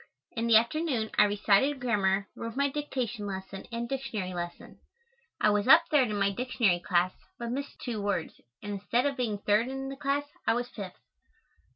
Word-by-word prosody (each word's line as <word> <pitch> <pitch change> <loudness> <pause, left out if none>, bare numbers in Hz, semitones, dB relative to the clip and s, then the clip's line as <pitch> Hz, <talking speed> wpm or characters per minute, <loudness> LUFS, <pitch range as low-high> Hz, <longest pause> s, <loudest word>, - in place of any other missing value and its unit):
In 230 0 -2
the 230 - +6
afternoon 235 0 +2
I 210 - +8
recited 205 +7 +2
grammar, 200 -5 +1
wrote 230 0 -6
my 280 +1 +2
dictation 250 -7 -3
lesson 190 0 -6
and 235 +1 -3
Dictionary 220 -8 -3
lesson. 175 -1 -7 0.6
I 210 - +4
was 205 +1 +1
up 315 +5 +9
third 270 -6 +4
in 210 - -2
my 200 0 +2
Dictionary 225 -5 +1
class 175 +1 +1 0.3
but 235 0 -4
missed 280 +3 -4
two 230 -4 -4
words, 200 -5 -2 0.2
and 205 - -4
instead 240 +5 +1
of 280 -1 0
being 235 -5 -1
third 210 +3 +2
in 270 +1 -4
the 275 - -5
class, 285 +1 -1 0.2
I - - +4
was 245 0 -1
fifth. 195 -4 -8
230 Hz, 185 wpm, -29 LUFS, 200-265 Hz, 0.6 s, up